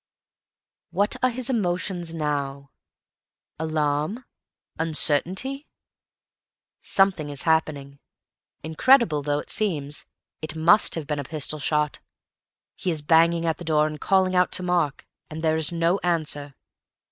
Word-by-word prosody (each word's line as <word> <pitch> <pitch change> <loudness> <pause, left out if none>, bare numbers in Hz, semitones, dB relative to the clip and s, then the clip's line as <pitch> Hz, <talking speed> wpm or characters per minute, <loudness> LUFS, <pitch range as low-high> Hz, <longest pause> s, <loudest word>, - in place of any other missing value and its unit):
What 200 +4 +1
are 255 - +3
his 250 0 -4
emotions 180 -6 -1
now? 140 -3 -3 0.9
Alarm, 155 - -1 0.5
uncertainty. 180 - 0 1.1
Something 190 -6 +1
is 145 -1 -4
happening. 145 -4 0 0.6
Incredible 160 - +3
though 145 0 -1
it 150 - -6
seems, 150 -9 -2 0.3
it 155 0 -5
must 170 +6 +4
have 165 -3 -4
been 150 0 -3
a - - -3
pistol 155 +1 -2
shot. 150 0 0 0.8
He 185 - -3
is 155 -3 -2
banging 165 +2 +3
at 160 -1 0
the - - -9
door 155 -2 +2
and 155 -1 -5
calling 190 -1 +2
out 180 -1 +3
to 185 - 0
Mark, 175 -6 0 0.2
and 160 +1 -7
there 160 -1 +2
is 160 -1 +2
no 170 +3 +1
answer. 150 -5 -2
160 Hz, 130 wpm, -24 LUFS, 150-180 Hz, 1.1 s, must